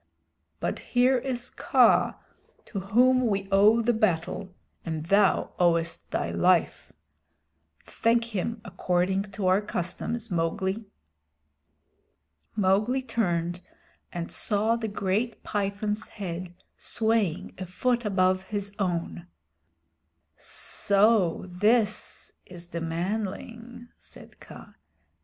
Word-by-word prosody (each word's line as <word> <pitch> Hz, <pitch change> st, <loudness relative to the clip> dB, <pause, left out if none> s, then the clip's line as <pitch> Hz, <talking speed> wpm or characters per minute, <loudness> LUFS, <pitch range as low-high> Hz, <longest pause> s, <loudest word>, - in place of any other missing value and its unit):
"But -, -, -2 dB
here 250 Hz, +1 st, +2 dB
is 245 Hz, -1 st, -4 dB
Kaa -, -, +3 dB, 0.5 s
to 200 Hz, -, -5 dB
whom 250 Hz, +6 st, +3 dB
we 195 Hz, -2 st, -1 dB
owe 210 Hz, +4 st, +5 dB
the 240 Hz, +2 st, +2 dB
battle 185 Hz, -2 st, -1 dB, 0.3 s
and 160 Hz, -2 st, -4 dB
thou 200 Hz, +2 st, +3 dB
owest 170 Hz, -1 st, +1 dB
thy -, -, -2 dB
life. 180 Hz, -2 st, +2 dB, 0.9 s
Thank 230 Hz, 0 st, 0 dB
him 225 Hz, +4 st, -2 dB
according 185 Hz, 0 st, 0 dB
to 205 Hz, -3 st, -3 dB
our 185 Hz, +2 st, +4 dB
customs, 210 Hz, +4 st, -3 dB
Mowgli." 190 Hz, +5 st, -1 dB, 1.7 s
Mowgli 210 Hz, +6 st, +2 dB
turned 175 Hz, -7 st, -1 dB, 0.5 s
and 170 Hz, -1 st, -5 dB
saw 215 Hz, +2 st, +2 dB
the 230 Hz, -1 st, -3 dB
great 205 Hz, +3 st, -2 dB
Python's 205 Hz, +1 st, -2 dB
head 180 Hz, -3 st, -6 dB, 0.2 s
swaying 220 Hz, -7 st, 0 dB
a 185 Hz, -, -5 dB
foot 240 Hz, +6 st, 0 dB
above 185 Hz, -2 st, +1 dB
his 200 Hz, 0 st, -4 dB
own. 170 Hz, -, -2 dB, 1.1 s
"So 200 Hz, -4 st, +1 dB
this 210 Hz, +4 st, 0 dB
is 175 Hz, -1 st, -10 dB
the 170 Hz, -1 st, -4 dB
manling," 220 Hz, +8 st, -4 dB
said -, -, -14 dB
Kaa. -, -, -13 dB
200 Hz, 100 wpm, -27 LUFS, 180-225 Hz, 1.7 s, owe